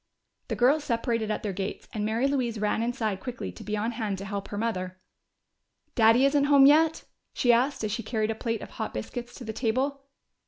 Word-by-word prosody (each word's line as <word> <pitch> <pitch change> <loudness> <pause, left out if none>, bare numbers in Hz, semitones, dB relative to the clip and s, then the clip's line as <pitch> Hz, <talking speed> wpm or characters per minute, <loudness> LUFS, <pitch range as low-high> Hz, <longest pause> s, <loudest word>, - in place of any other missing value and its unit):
The - - -2
girls 280 +5 +3
separated 230 -3 -1
at 215 - -2
their 205 -2 -2
gates, 195 +1 -5
and 210 - -2
Mary 225 +5 +1
Louise 250 -5 -1
ran 210 +1 0
inside 230 -4 -1
quickly 240 - -5
to 90 - -11
be 210 0 -2
on 220 +3 -1
hand 220 -4 -3
to 195 - -7
help 200 0 -4
her 205 - -6
mother. 185 -4 -3 0.9
"Daddy 225 +3 +5
isn't 280 0 +3
home 280 -1 +7
yet?" 315 +3 +5 0.3
she 245 -1 +4
asked, 255 +2 +1
as 215 - -1
she 230 +3 -2
carried 220 -2 -1
a - - 0
plate 230 0 -3
of - - -10
hot - - -5
biscuits 240 - -6
to - - -9
the 220 -1 -5
table. 265 +5 -1
230 Hz, 210 wpm, -27 LUFS, 215-260 Hz, 0.9 s, home